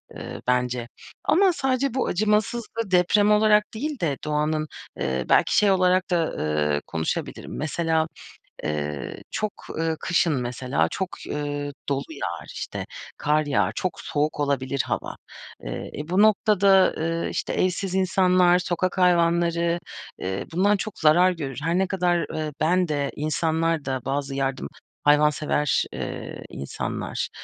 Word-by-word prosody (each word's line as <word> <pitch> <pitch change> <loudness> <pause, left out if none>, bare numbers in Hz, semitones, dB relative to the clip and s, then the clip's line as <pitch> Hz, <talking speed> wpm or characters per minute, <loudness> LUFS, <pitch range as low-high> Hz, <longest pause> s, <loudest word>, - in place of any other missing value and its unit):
eee, - - -7
bence 125 -1 0 0.4
ama 370 +2 +4
sadece 265 -3 0
bu 260 - 0
acımasızlığı 215 +2 0
deprem 205 +4 +4
olarak 210 0 +4
değil 285 +3 -3
de 145 -5 0
doğanın, 150 +1 0 0.3
eee, 65 -1 -1
belki - - +4
şey 205 -1 +5
olarak 185 -1 +3
da, 165 -2 +1 0.4
eee, 75 - 0
konuşabilirim. 80 -1 -3
Mesela, 160 +1 0 0.6
eee, 75 -2 -3
çok, 215 -2 -2 0.2
ııı, 160 0 -1
kışın 170 -1 +2
mesela 125 +2 0
çok, 190 -1 -2 0.2
ııı, 145 -1 -3 0.2
dolu 140 0 0
yağar 85 - -5
işte, - - -5 0.3
kar 150 +1 +1
yağar, 145 - +1
çok 185 - -3
soğuk 150 +1 -1
olabilir 140 -2 0
hava. - - -3 0.5
Eee, - - -5
e, 150 - -6
bu 185 +3 +3
noktada, 200 -3 +5
eee, 165 +1 -1
işte - - -3
evsiz 185 +1 0
insanlar, 185 -1 +4
sokak 180 +1 -1
hayvanları, 170 -1 +3 0.4
eee, 95 +1 -3
bundan 200 +4 +3
çok 215 +1 -6
zarar 170 +4 +5
görür. 140 -7 -5
Her 165 +2 +1
ne 190 0 +2
kadar, 175 -2 +1
eee, 155 -1 -2
ben 180 +3 +3
de 145 -2 -1
insanlar 160 +1 0
da 130 -1 -2
bazı 135 0 -2
yardım 135 -1 -1 0.4
hayvansever, 150 0 +3
eee, - - -6
insanlar, 70 - -4
165 Hz, 140 wpm, -24 LUFS, 145-185 Hz, 0.6 s, şey